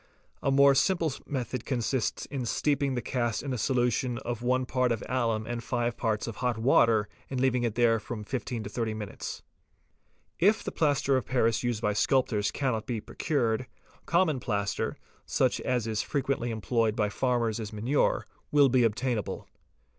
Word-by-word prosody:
A - - +1
more 140 0 +6
simple 165 0 +2
method 125 -3 -3
consists 125 -1 -1
in 130 -4 -4
steeping 140 +1 +1
the 120 - -2
cast 120 -3 -1
in 140 -2 -3
a - - -2
solution 125 0 +1
of 120 -1 -4
1 130 +1 +1
part 125 -1 +1
of 115 - -1
alum 115 -4 0
and 120 0 -4
5 120 -1 -1
parts 110 -4 -1
of 115 -3 -6
hot 125 -3 0
water 110 -2 +4 0.2
and 130 - -2
leaving 125 -1 +2
it 115 -3 -1
there 115 -1 +3
for 105 - -19
from 110 -3 -4
15 120 0 -4
to - - -6
30 115 -3 -2
minutes®™), 105 -2 -6 1.0
If 205 +5 +4
the - - -4
plaster 140 -3 +2
of 130 - -3
paris 115 -3 +2
used 120 -2 -2
by 105 - +2
sculptors 105 -3 +2
cannot 125 -6 -2
be 120 -3 -2
procured, 120 -1 -1 0.4
common 170 -5 +2
plaster, 100 -5 -2 0.3
such - - +1
as 125 -3 0
is 110 -2 -1
frequently 135 -4 -1
employed 110 0 0
by 105 -2 +1
farmers 120 -1 0
as 110 -2 -5
manure, 115 +7 +1 0.3
will 145 -2 +6
be 125 0 +4
obtainable. 115 0 -1
120 Hz, 175 wpm, -28 LUFS, 110-130 Hz, 1.0 s, more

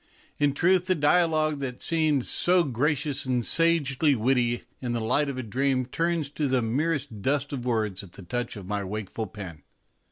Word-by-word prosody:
In 145 -1 +2
truth, 180 +3 +3
the 185 - +3
dialogue 155 -1 +2
that 130 -3 -4
seemed 155 -5 +1
so 180 0 +4
gracious 145 +1 0
and 125 -3 0
sagely 155 -4 +2
witty 120 0 +1 0.2
in 125 -2 -2
the 120 - -1
light 125 +6 +1
of 135 - -5
a 130 - -3
dream 130 +3 0
turns 165 +2 -1
to 150 -1 -1
the 130 -2 +1
merest 135 -2 -1
dust 145 +4 0
of 125 -3 -4
words 110 -6 -1
at 95 -3 -13
the 95 - -11
touch 120 +7 -3
of 100 - -8
my 100 +1 -2
wakeful 105 +2 -5
pen. 90 -8 -9
135 Hz, 185 wpm, -26 LUFS, 115-150 Hz, 0.2 s, so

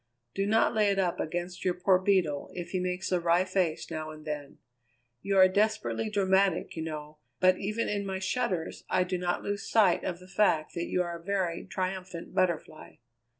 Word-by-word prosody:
Do 195 0 -1
not 220 +3 +3
lay 215 -2 +3
it 200 - +1
up 180 -3 0
against 175 +2 -3
your 180 -1 +1
poor 180 +1 +3
Beetle 185 -7 +1
if 175 -1 -6
he 185 - 0
makes 180 +1 -2
a 180 - +3
wry 170 +2 +3
face 185 -4 -1
now 155 -1 -4
and 155 0 -11
then. 150 -2 -5 0.6
You 195 +4 0
are 185 0 +8
desperately 215 +2 0
dramatic, 195 -3 +2
you 160 - -4
know, 155 -1 -6 0.2
but 185 0 +4
even 215 +3 -1
in 205 -1 -1
my 190 -1 -3
shudders 190 -3 -2
I 185 - +3
do 180 0 -2
not 175 0 -1
lose 205 0 -3
sight 205 -6 +4
of 180 -2 -2
the 185 +1 -15
fact 185 -6 +2
that 170 -1 -3
you 180 - +1
are 170 -1 -5
a - - -18
very 185 -3 -1
triumphant 185 -2 -4
Butterfly." 170 -4 -1
185 Hz, 195 wpm, -29 LUFS, 170-195 Hz, 0.6 s, are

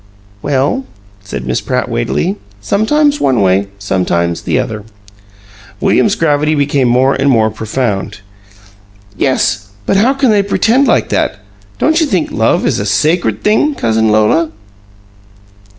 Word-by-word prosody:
"Well," 145 - 0 0.4
said 80 -10 -6
Miss 65 -1 -1
Pratt, - - -2
weightily, 75 +11 -2 0.2
"sometimes 285 - +1
one 130 -4 +2
way, 95 0 +2
sometimes 85 -3 -1
the - - -1
other." 110 -2 -3 1.0
William's 205 - +2
gravity 150 -1 +1
became 140 -2 +1
more 130 +3 +3
and 135 +1 +1
more 110 -4 +2
profound. 110 -2 -3 0.9
"Yes, 105 -6 0 0.2
but 195 - +1
how 245 +7 +3
can 270 -4 +2
they 205 -1 +3
pretend 225 +7 +2
like - - +1
that? - - -1 0.4
Don't 320 +1 +2
you 315 - +2
think 185 - -1
love 110 +1 +1
is - - 0
a 100 - -2
sacred 110 - 0
thing, 275 +8 +2
Cousin 110 - +1
Lola?" 110 +10 +2
130 Hz, 135 wpm, -13 LUFS, -, 1.0 s, more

